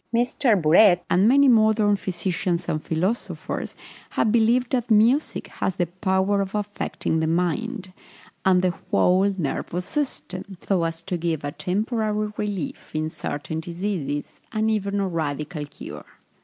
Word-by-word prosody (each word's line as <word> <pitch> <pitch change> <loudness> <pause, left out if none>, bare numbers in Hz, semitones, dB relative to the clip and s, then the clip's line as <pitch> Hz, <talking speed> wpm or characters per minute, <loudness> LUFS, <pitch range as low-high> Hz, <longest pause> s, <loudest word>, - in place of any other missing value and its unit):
M. 235 +1 +3 0.3
Burette, 175 +3 +6
and 190 +4 +5
many 280 +3 +6
modern 220 -3 +4
physicians 180 -2 -2
and 155 - -1
philosophers, 185 +9 -2 0.3
have 220 - +1
believed 235 +2 +3
that 245 -2 0
music 230 +7 +3
has 190 - -3
the 175 - +1
power 190 +3 0
of 195 +1 -4
affecting 205 -5 -2
the 160 - 0
mind, 185 - -1 0.5
and 185 -1 +4
the 180 -1 +2 0.2
whole 190 +3 +3
nervous 175 +2 -3
system, 195 -9 -3
so 185 -4 0
as 165 0 -4
to 180 0 -2
give 165 -3 -2
a 145 - -2
temporary 215 - -1
relief 195 -8 -4
in 155 0 -1
certain 155 +2 -4
diseases, 170 -4 -4
and 220 0 +1
even 200 -1 -1
a 195 - 0
radical 150 -2 -3
cure. - - -9
190 Hz, 140 wpm, -24 LUFS, 170-215 Hz, 0.5 s, Burette